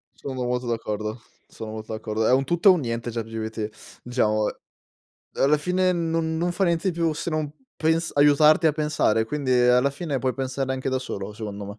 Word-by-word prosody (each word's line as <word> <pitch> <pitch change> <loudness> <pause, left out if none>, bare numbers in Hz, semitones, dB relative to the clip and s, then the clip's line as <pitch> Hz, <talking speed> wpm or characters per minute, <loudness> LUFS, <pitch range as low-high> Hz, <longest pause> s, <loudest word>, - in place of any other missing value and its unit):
Sono 130 -2 -5
molto 125 0 -2
d'accordo, 110 -1 -3 0.3
sono 110 -1 -8
molto 110 0 -7
d'accordo. 110 0 -2
È - - +4
un 135 +1 +3
tutto 175 +6 +4
e - - +9
un 175 - +1
niente 115 -1 -3
ChatGPT, 110 -1 -6
diciamo. 110 -4 +1
E - - -6 0.9
alla 145 +3 +5
fine, 180 +3 +1
non, 165 -1 -1
non 175 +1 0
fa 195 - +1
niente 170 +2 +1
di 170 - -8
più 165 -2 +2
se 170 - -4
non 155 -2 -2 0.3
pens 160 +1 +1
aiutarti 150 +3 +5
a - - +2
pensare, 150 -8 +1
quindi, 135 +1 -2
alla 125 +2 +4
fine, 140 -1 -3
puoi 130 -1 0
pensare 130 0 -2
anche 130 0 -3
da 130 0 0
solo, 100 -4 -5
secondo 105 -2 -6
me. 100 +2 -9
130 Hz, 200 wpm, -24 LUFS, 110-155 Hz, 0.9 s, e